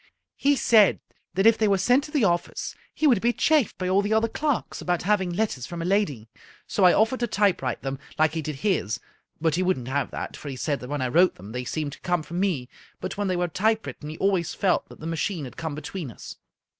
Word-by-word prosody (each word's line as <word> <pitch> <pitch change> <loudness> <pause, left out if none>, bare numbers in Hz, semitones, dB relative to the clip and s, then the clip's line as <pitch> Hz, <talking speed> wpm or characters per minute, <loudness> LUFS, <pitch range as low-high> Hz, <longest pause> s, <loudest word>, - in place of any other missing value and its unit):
He 285 +1 +3
said 220 -6 +5 0.4
that 195 +2 +2
if 225 0 +6
they 215 - +3
were 200 -1 +3
sent 245 +9 +3
to 300 - -10
the 290 -6 +1
office 175 -3 0 0.2
he 315 - -2
would 245 -9 +5
be 235 - +3
chaffed 300 -1 +2
by 185 - -2
all 190 +2 +3
the 205 +2 0
other 220 +1 +3
clerks 290 +2 -2
about 175 -1 -1
having 190 -1 +2
letters 175 - -2
from 175 - -6
a 165 - -3
lady, 175 - 0 0.4
so 195 - +2
I 180 - +8
offered 225 +7 +2
to 240 - 0
typewrite 190 - 0
them, 135 -1 -3 0.2
like 155 0 +3
he 165 - -2
did 145 -2 -6
his, 155 - +1 0.4
but 160 0 +1
he 175 - +1
wouldn't 180 -10 0
have 140 +1 0
that, - - -5
for 145 - -8
he 135 - -5
said 140 +2 -1
that 125 - -9
when 145 -2 -2
I - - +1
wrote 175 +9 +4
them 100 +4 -11
they 125 +1 -4
seemed 150 +2 -3
to - - -12
come 175 -2 0
from 170 +3 -5
me, 175 -11 0 0.3
but 185 - -4
when 205 0 -1
they 185 - 0
were 175 0 +1
typewritten 210 -4 -1
he 155 - -7
always 185 -4 +1
felt 190 -2 +1
that - - -14
the - - -7
ma 165 0 -2
chine 165 -2 -2
had 125 - -10
come 160 -3 -4
between 155 +1 -6
us. 115 - -10
180 Hz, 250 wpm, -25 LUFS, 150-205 Hz, 0.4 s, I